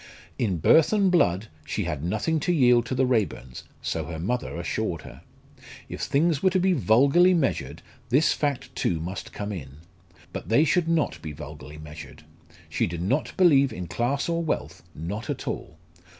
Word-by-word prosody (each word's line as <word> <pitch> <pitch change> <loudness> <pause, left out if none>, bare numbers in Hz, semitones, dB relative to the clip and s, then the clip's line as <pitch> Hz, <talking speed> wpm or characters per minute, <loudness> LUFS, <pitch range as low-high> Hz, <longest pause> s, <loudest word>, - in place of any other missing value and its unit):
In 100 -7 0
birth 150 - +5
and 200 -3 +3
blood 100 - +2 0.2
she 105 - -3
had 80 -5 -3
nothing 110 - 0
to 165 - 0
yield 125 -7 +4
to 130 - -2
the 130 +1 +2
Raeburns 105 - -2 0.2
so - - -2
her 80 - -6
mother 105 +5 -2
assured 85 -1 -3
her. - - -12 0.7
If - - -6
things 150 +1 +1
were 190 - +4
to 185 0 +1
be 185 +1 +3
vulgarly 140 +8 +4
measured, 155 -6 -1 0.3
this 140 +6 +4
fact 145 -3 -2
too 85 - 0
must 85 +2 -6
come 105 0 -5
in. 70 -8 -7 0.6
But - - -6
they 115 +7 +5
should 170 +1 +2
not 165 -2 0
be 80 - -6
vulgarly 75 0 -10
measured. 75 0 -11 0.4
She 75 - 0
did 85 0 -4
not 130 +11 -1
believe 140 -8 +5
in 90 -5 -5
class 120 +9 -1
or 170 0 0
wealth 160 - -3
not 100 +8 -5
at - - -4
all. 80 - -5
120 Hz, 180 wpm, -25 LUFS, -, 0.7 s, birth